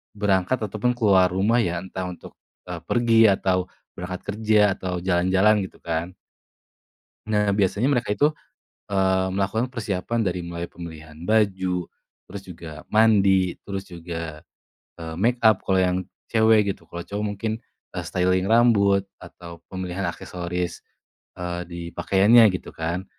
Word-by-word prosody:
berangkat 100 +4 +1
ataupun 105 +4 0
keluar 95 -5 +5
rumah 105 +6 +2
ya 85 -4 -1
entah 95 0 -5
untuk, 90 - -11 0.3
eee, 90 - -4
pergi 115 -2 +3
atau 95 -1 +1 0.3
berangkat 90 +1 -5
kerja 110 -1 +3 0.2
atau 90 -1 -3
jalan-jalan 95 +3 +3
gitu - - -13
kan. 85 +2 -3 1.1
Nah 105 -2 +1
biasanya 105 +6 +1
mereka 125 -6 +1
itu, 145 +7 +3 0.6
eee, 95 -1 +1
melakukan 105 +6 -1
persiapan 115 0 -2
dari 90 -3 -1
mulai 85 0 -5
pemilihan 80 -2 -10
baju, 95 -4 +1 0.4
terus 100 +1 -7
juga 80 -3 -10
mandi 100 -5 +4
terus 95 -1 -4
juga, 85 -2 -7 0.5
eee, 80 -1 -6
makeup 115 -1 +3
kalau 95 -1 +3
yang 90 0 +1 0.3
cewek 110 -2 +4
gitu - - -20
kalau 85 0 -7
cowok 105 +1 -4
mungkin, 105 +2 -3 0.4
eee, - - -4
styling 90 +1 +1
rambut 105 -4 +4 0.2
atau 85 -1 -11
pemilihan 95 0 -4
aksesoris, 90 0 -4 0.5
eee, 90 0 -4
di 85 -1 -7
pakaiannya 110 +6 +5
gitu - - -6
kan. 85 +3 -3
95 Hz, 135 wpm, -24 LUFS, 90-105 Hz, 1.1 s, keluar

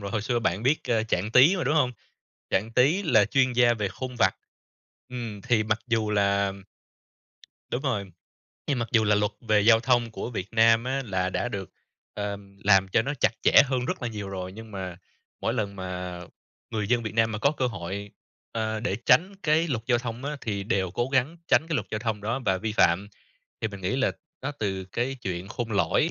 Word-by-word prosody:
rồi 100 -1 -5
hồi 110 +1 -1
xưa 120 +2 0
bạn 100 -2 -1
biết, 140 +5 +1
ơ, 115 -2 +2
Trạng 105 -1 -1
Tí 145 +11 +6
mà, 180 - -2
đúng 150 - +1
hông? 130 -5 +3 0.6
Trạng 105 +4 0
Tí 145 - +3
là 110 - +4
chuyên 130 +3 +2
gia 120 -1 +4
về 105 -3 -2
khôn 130 +4 -6
vặt, - - +4 0.7
ừm. 115 -5 -6
Thì 115 -3 +2
mặc 110 +1 0
dù 110 -3 0
là 100 -1 +2 1.2
Đúng 125 - -2
rồi. 100 - -2 0.5
Nhưng 140 -4 0
mặc 120 - -2
dù 110 -1 +4
là 105 0 +4
luật 105 0 +1
về 110 -3 +2
giao 115 +1 +6
thông 120 -2 +2
của 120 - -5
Việt 100 -4 -4
Nam 115 +1 +5
á 135 +1 -1
là 95 -3 -1
đã 120 - -1
được, 100 -5 -5 0.4
ờm, 100 -1 -6
làm 95 -2 +5
cho 110 +4 +2
nó 145 +4 -2
chặt - - +4
chẽ - - +7
hơn 130 -2 -1
rất - - -3
là 120 - -1
nhiều 105 -3 -6
rồi, 95 -1 -5
nhưng 110 +1 -10
mà 95 -3 -6 0.4
mỗi 115 - 0
lần 100 -4 -2
mà 90 -1 -5 0.5
người 105 -3 -2
dân 120 0 +2
Việt 110 0 -5
Nam 115 -1 +2
mà 105 - -3
có 140 +6 +3
cơ 135 -4 -1
hội, 100 -1 -5 0.4
ơ, 110 -1 -2
để 105 -4 -1
tránh 180 +10 +4
cái 160 +2 +2
luật 115 -5 -2
giao 120 -2 +3
thông 120 +1 -6
á, 150 +1 -3
thì 100 -3 -3
đều 95 -3 0
cố 120 +6 -1
gắng 135 +6 +1
tránh 160 - +4
cái 160 - -1
luật - - -1
giao 110 - -2
thông 110 -2 -2
đó 115 +6 -2
và 95 -1 +2
vi 110 +1 -3
phạm. 100 0 +3 0.5
Thì 110 - -1
mình 100 -2 -9
nghĩ 95 +8 -1
là 130 - +1 0.3
đó 145 +2 -2
từ 95 -3 -2
cái 120 +8 -2
chuyện 90 0 -4
khôn 115 0 -4
lỏi 100 - +2
110 Hz, 220 wpm, -26 LUFS, 100-125 Hz, 1.2 s, chẽ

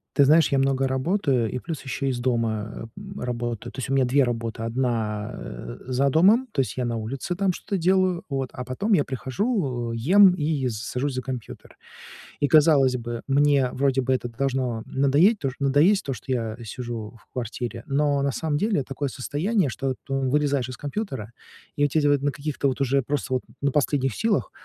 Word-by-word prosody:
Ты 140 - +6
знаешь, 155 +1 +5
я 135 - +3
много 135 0 +2
работаю, 130 - +1
и - - -3
плюс 160 -2 -6
ещё 135 +1 -3
из 125 -2 -1
дома, 115 -3 -2
м, - - -8
работаю. 120 -2 -3
То - - -9
есть 130 - -4
у - - 0
меня 135 - +4
2 135 +2 +3
работы. 115 -2 -3
Одна, 115 -3 -1
э, - - -8
за 130 +2 +2
домом, 200 - +4
то 150 - -3
есть 130 - -3
я 125 - 0
на 120 -1 -2
улице 125 +10 -4
там 190 0 +1
что-то 195 - -3
делаю, 185 0 +2
вот, 135 -2 -2
а 125 - -5
потом 130 - -2
я 145 - +3
прихожу, 130 - -2
э, - - -3
ем 185 - +6
и 150 -5 -1
с 110 -3 -3
сажусь 130 +2 -2
за 130 - -2
компьютер. 125 -2 -8 0.6
И 145 - +2
казалось 145 -3 +5
бы, 120 -1 -5
мне 140 -2 +3
вроде 135 0 +1
бы 130 0 +1
это 125 -1 -2
должно 130 -4 -1
надоесть- 145 - +3
то 135 - -1
надоесть, 145 +9 +4
то, 135 - -2
что 125 +3 -5
я 115 -3 -2
сижу 115 -1 -6
в - - -29
квартире, 120 -1 -5
но 140 0 +1
на 140 0 0
самом 155 0 -1
деле 200 -2 +1
такое 140 +2 -3
состояние, 155 - 0
что 130 +4 -2
ты 135 - -1 0.2
вылезаешь 140 -3 +1
из 125 - -7
компьютера, 140 - -4 0.4
и 145 - +3
у - - +3
тебя 145 0 +2
вот 145 -1 +2
на 145 - +2
каких-то 140 0 -2
вот 130 - -3
уже 135 0 +2
просто 135 0 -2
вот 130 - 0 0.2
на 140 - +1
последних 135 -3 +1
силах, 220 - 0
135 Hz, 200 wpm, -24 LUFS, 125-145 Hz, 0.6 s, Ты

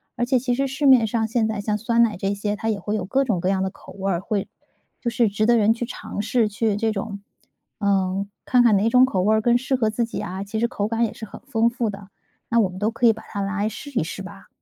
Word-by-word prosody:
而 240 - 0
且 255 0 +2
其 245 0 -1
实 275 +2 0
市 270 +2 -3
面 255 -4 +7
上 220 0 0
现 225 0 +1
在 220 -2 -3
像 210 0 -1
酸 230 +2 +1
奶 225 -3 +1
这 195 +2 -1
些， 205 +1 -2
它 220 +2 -3
也 210 -2 -1
会 205 +3 -3
有 200 -4 -2
各 270 +8 +1
种 220 -8 0
各 185 +2 0
样 190 -1 +1
的 190 - -1
口 195 - -15
味 195 0 -3
儿， 170 - -1
会 200 0 -2 0.5
就 240 - -1
是 235 0 +2
值 205 +2 0
得 235 +1 +4
人 220 0 +4
去 235 +1 -4
尝 240 - -7
试， 225 0 +2
去 210 0 0
这 220 +1 0
种， 200 0 -4 0.6
嗯， 195 -1 0 0.2
看 250 -1 +4
看 230 -3 +5
哪 210 +4 +2
种 250 +2 +6
口 195 -8 -1
味 215 +3 +3
更 240 +2 +3
适 260 +2 -1
合 225 -4 +1
自 235 +2 0
己 230 - -6
啊， 190 +2 -5
其 205 +2 -4
实 235 - +2
口 210 -4 -2
感 230 +1 +1
也 220 - -5
是 220 - -8
很 - - -12
丰 235 -4 +2
富 235 -2 -2
的， 200 -1 -10 0.4
那 235 - +3
我 205 -5 +3
们 185 0 -9
都 210 +2 +1
可 230 +1 -1
以 225 - +7
把 220 - -12
它 200 - -4
拿 195 +1 -2
来 205 +2 0
试 285 +6 -9
一 260 - 0
试 190 +4 -6
吧。 195 +1 -12
220 Hz, 310 characters per minute, -23 LUFS, 200-235 Hz, 0.6 s, 面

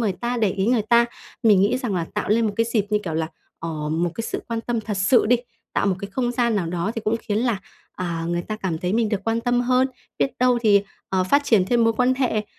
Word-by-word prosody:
người 215 -5 +1
ta, 240 +6 -3
để 215 -4 +2
ý 190 +2 -1
người 240 -2 +3
ta. 235 +2 +4 0.4
Mình 210 -4 +5
nghĩ 225 +6 +2
rằng 245 -7 -2
là 170 -2 -1
tạo 210 - -2
lên 225 +2 +3
một 210 - -1
cái 230 0 +2
dịp 210 -3 +1
như 210 - +3
kiểu 165 - -3
là, 160 0 0 0.3
ờ, 155 -2 -4
một 165 +2 0
cái 230 - -3
sự - - -4
quan 230 -1 -2
tâm 235 -1 -2
thật 210 -1 -4
sự 205 +6 +4
đi, 245 +2 +5 0.4
tạo - - +1
một 190 - +1
cái 200 +1 -7
không 245 +3 -1
gian 235 -3 +1
nào 175 -4 -1
đó, 175 +4 -2
thì 225 - -3
cũng 220 +2 +1
khiến 210 0 -1
là, 235 -3 0 0.3
à, 170 -2 -3
người 175 0 -1
ta 215 +3 -5
cảm 185 -6 -3
thấy 180 +3 -2
mình 225 -1 +2
được 205 -2 -1
quan 225 0 0
tâm 245 +1 +1
hơn. 255 +1 +2 0.3
Biết 270 - +2
đâu 250 -1 +3
thì, 205 -2 +5 0.3
ờ, 185 -1 +1
phát 285 +9 +3
triển 215 -8 +4
thêm 235 +2 +3
mối 225 - +4
quan 250 +3 +2
hệ, 240 -5 0
215 Hz, 275 wpm, -23 LUFS, 190-240 Hz, 0.4 s, Mình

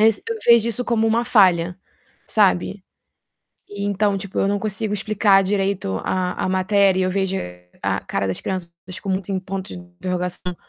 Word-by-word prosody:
es 220 0 +4
eu 455 - -2
vejo 235 -1 +5
isso 235 +2 -2
como 225 -2 +1
uma 230 +2 +2
falha, 180 -6 +3 0.5
sabe. 195 -1 +1 0.8
E 205 -1 -6
então, 205 0 +1
tipo, 195 0 -5
eu - - +2
não 205 0 0
consigo 210 0 -1
explicar 200 -1 +3
direito 195 - -1
a 180 -1 -1
a - - -1
matéria, 190 0 +3
eu 185 - 0
vejo 190 0 -1 0.5
a - - 0
cara 100 0 -2
das 95 - -3
crianças 185 -3 -4
des 185 0 -7
com 195 - -6
muitos 190 0 -2
em 190 -1 0
pontos 190 0 -6
de 180 - -10
interrogação, 180 0 -4
195 Hz, 180 wpm, -21 LUFS, 185-205 Hz, 0.8 s, vejo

